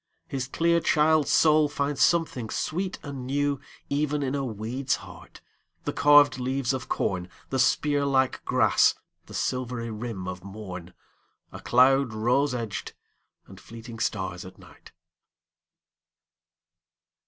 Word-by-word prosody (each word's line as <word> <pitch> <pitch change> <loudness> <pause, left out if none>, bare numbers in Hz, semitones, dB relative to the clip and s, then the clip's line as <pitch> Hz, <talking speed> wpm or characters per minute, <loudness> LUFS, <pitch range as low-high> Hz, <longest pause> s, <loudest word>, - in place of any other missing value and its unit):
His 130 -1 -3
clear 170 +4 +2
child's 155 -2 +3
soul 155 -1 +4
finds 145 -1 -2
something 155 -9 +2
sweet 180 - -2
and 135 -3 -7
newEven 145 +1 -2
in 130 0 -2
a 140 -1 -1
weed's 120 +3 -2
heart, - - -13 0.4
the - - -3
carved 145 -2 +5
leaves 130 +1 -1
of 130 -3 -5
corn, 90 -1 -1 0.2
The 130 - 0
spear 145 +2 +2
like 135 -2 +1
grass, - - +3 0.3
the - - -10
silvery 125 -2 -2
rim 110 -4 -5
of 90 -1 -6
morn,A 95 -3 -11
cloud 130 0 +3
rose 125 +5 +1
edged, 115 -4 -5 0.5
and 95 - -14
fleeting 115 0 -10
stars 95 -4 -2
at 95 0 -12
night! - - -17
130 Hz, 120 wpm, -26 LUFS, 110-145 Hz, 0.5 s, carved